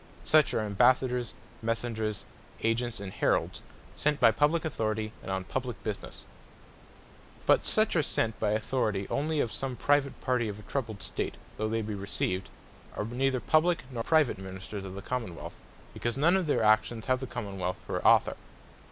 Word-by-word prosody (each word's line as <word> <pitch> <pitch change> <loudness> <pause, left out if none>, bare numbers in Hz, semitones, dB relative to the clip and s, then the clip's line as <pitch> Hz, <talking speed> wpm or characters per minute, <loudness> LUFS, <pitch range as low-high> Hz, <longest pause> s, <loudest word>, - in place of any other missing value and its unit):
Such 155 -1 +5
are - - +2
Ambassadors, 125 +3 +2 0.3
Messengers, 115 -2 -2 0.4
Agents, 115 0 0
and 100 -2 -6
Heralds, - - +1 0.3
sent 150 -1 +1
by 115 -2 +7
publique 150 +7 +2
Authoritie, 110 -7 -1
and - - -8
on 95 0 -1
publique 125 +5 -3
Businesse. 105 -2 -5 1.2
But - - +4
such 215 -2 +3
as - - +4
are 150 - 0
sent 110 -1 0
by 105 - +1
Authoritie 110 -3 0
only 155 +2 0
of 115 - -1
some 135 -2 -3
private 145 +1 +1
partie 125 -3 0
of 105 - -5
a 105 - -11
troubled 110 -5 -4
State, - - -3 0.2
though 110 0 -1
they 115 0 0
be 105 0 -4
received, 95 -1 -2 0.5
are 105 - -2
neither 130 +3 0
Publique, 155 +5 +2
nor 120 -2 -3
Private 155 -4 +3
Ministers 95 +1 -7
of 95 0 -7
the 100 - -7
Common 115 -7 -3
wealth; - - -8 0.4
because 120 +2 -2
none 165 +6 +4
of 185 -4 +1
their 145 - +2
actions 110 +1 +3
have 130 -1 +2
the 130 - -5
Common 100 -6 -5
wealth 90 0 -2
for - - -3
Author. - - +5
115 Hz, 180 wpm, -29 LUFS, 105-135 Hz, 1.2 s, by